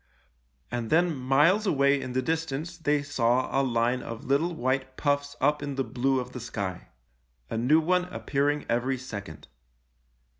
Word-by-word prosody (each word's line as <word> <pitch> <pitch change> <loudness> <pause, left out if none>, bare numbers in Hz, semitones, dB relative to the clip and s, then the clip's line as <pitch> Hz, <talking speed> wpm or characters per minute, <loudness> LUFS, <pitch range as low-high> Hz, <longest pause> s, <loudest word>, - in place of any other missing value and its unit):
And 120 -2 -3
then 170 0 +3
miles 145 +11 +3
away 140 -4 +3
in 125 - -5
the 130 0 0
distance 160 +1 -2
they 150 -3 0
saw 130 -3 +1
a 135 - +4
line 120 -1 +1
of 115 -1 -7
little 140 +6 +1
white 130 -1 -1
puffs 145 0 0
up 150 +2 +2
in 145 -1 -4
the 135 - 0
blue 130 +1 0
of 125 0 -6
the 125 - -7
sky 100 -6 -5 0.3
— - - -43
a - - -1
new 140 +7 +4
one 180 +3 +2
appearing 145 -4 -1
every 125 +3 0
second. 100 -10 -8
135 Hz, 165 wpm, -27 LUFS, 125-150 Hz, 0.3 s, a